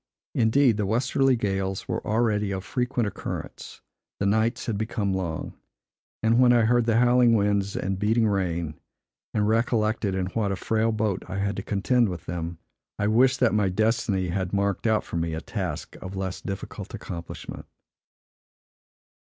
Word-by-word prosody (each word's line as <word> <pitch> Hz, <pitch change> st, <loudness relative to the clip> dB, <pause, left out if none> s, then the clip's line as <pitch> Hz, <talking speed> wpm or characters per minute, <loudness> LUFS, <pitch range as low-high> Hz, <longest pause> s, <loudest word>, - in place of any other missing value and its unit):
Indeed, 115 Hz, 0 st, +3 dB
the 105 Hz, -2 st, 0 dB
westerly 130 Hz, +4 st, +2 dB
gales 95 Hz, -3 st, -2 dB
were -, -, -2 dB
already 105 Hz, -2 st, +1 dB
of 95 Hz, -1 st, -3 dB
frequent 125 Hz, +1 st, -1 dB
occurrence; 105 Hz, -, -6 dB, 0.4 s
the 100 Hz, -, 0 dB
nights 110 Hz, +4 st, +1 dB
had 115 Hz, -, -1 dB
become 105 Hz, -2 st, -1 dB
long, 85 Hz, -4 st, -3 dB, 0.7 s
and 115 Hz, +2 st, +4 dB
when 125 Hz, -1 st, +6 dB
I 120 Hz, -1 st, +5 dB
heard 120 Hz, +1 st, +3 dB
the 115 Hz, -1 st, +3 dB
howling 120 Hz, -1 st, +5 dB
winds 100 Hz, -1 st, +1 dB
and 95 Hz, 0 st, -2 dB
beating 110 Hz, +2 st, +2 dB
rain, 85 Hz, -6 st, -1 dB, 0.5 s
and 105 Hz, -1 st, +1 dB
recollected 110 Hz, -3 st, +1 dB
in 95 Hz, -1 st, 0 dB
what 105 Hz, -2 st, 0 dB
a -, -, 0 dB
frail 110 Hz, +3 st, 0 dB
boat 110 Hz, -3 st, -1 dB
I 95 Hz, +1 st, -4 dB
had 100 Hz, 0 st, -1 dB
to -, -, -2 dB
contend 110 Hz, +4 st, +1 dB
with 85 Hz, -4 st, -6 dB
them, 85 Hz, 0 st, -4 dB, 0.4 s
I 105 Hz, -, 0 dB
wished 125 Hz, +5 st, +4 dB
that 125 Hz, -, +4 dB
my 105 Hz, -3 st, +2 dB
destiny 105 Hz, -2 st, +1 dB
had 95 Hz, +1 st, -2 dB
marked 100 Hz, +2 st, 0 dB
out 110 Hz, -1 st, +2 dB
for -, -, -5 dB
me 80 Hz, -1 st, -1 dB
a -, -, -3 dB
task 90 Hz, -8 st, -4 dB
of 95 Hz, +1 st, -7 dB
less 95 Hz, -1 st, -4 dB
difficult 95 Hz, -1 st, -6 dB
accomplishment. 85 Hz, -1 st, -7 dB
105 Hz, 165 wpm, -26 LUFS, 95-115 Hz, 0.7 s, when